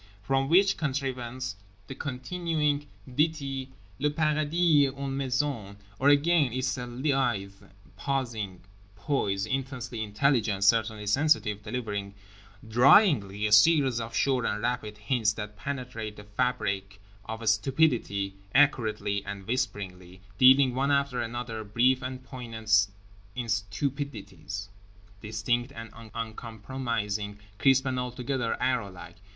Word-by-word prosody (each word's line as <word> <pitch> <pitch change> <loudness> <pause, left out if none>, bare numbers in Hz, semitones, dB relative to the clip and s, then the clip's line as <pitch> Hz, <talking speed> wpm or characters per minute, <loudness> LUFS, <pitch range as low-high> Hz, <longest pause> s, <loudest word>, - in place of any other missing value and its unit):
From 135 +4 +1
which 195 +4 +5
contrivance 130 -4 -3 0.3
the - - -7
continuing 145 +2 -2 0.2
ditty 135 -1 -1 0.3
"le 150 - +2
paradis 155 0 +3
est 135 +1 -7
une 135 -1 -3
maison…." 130 -6 -2 0.2
—Or 140 - +4
again, 145 -1 +4
it's 130 0 -1
a 125 - -5
lithe 120 -6 0 0.4
pausing 115 -9 -3 0.3
poise, 100 -6 -1
intensely 125 -1 -4
intelligent, 105 -2 +1
certainly 110 0 +2
sensitive, 105 -3 +2
delivering 105 -3 -4 0.5
dryingly 120 - +5
a 105 - 0
series 135 +2 +5
of 115 0 -5
sure 130 -3 +2
and 105 -1 -2
rapid 120 -3 -2
hints 105 0 +1
that 105 -1 -7
penetrate 120 -3 -5
the 105 - -11
fabric 105 -3 -2 0.3
of 110 +1 -6
stupidity 110 -4 +1 0.2
accurately 110 -8 +2
and 100 -1 -7
whisperingly; 95 -7 -3 0.2
dealing 130 0 +7
one 135 +2 0
after 140 -3 +1
another 115 -1 -4
brief 120 +5 +2
and 130 0 -6
poignant 110 -5 +1 0.5
instupidities, 105 - -3 0.5
distinct 110 +3 -1
and 115 0 -9 0.2
uncompromising, 110 -2 -4 0.2
crisp 135 +2 +4
and 130 -1 -1
altogether 125 -1 -2
arrowlike. 100 -9 -2
120 Hz, 110 wpm, -28 LUFS, 105-135 Hz, 0.5 s, dealing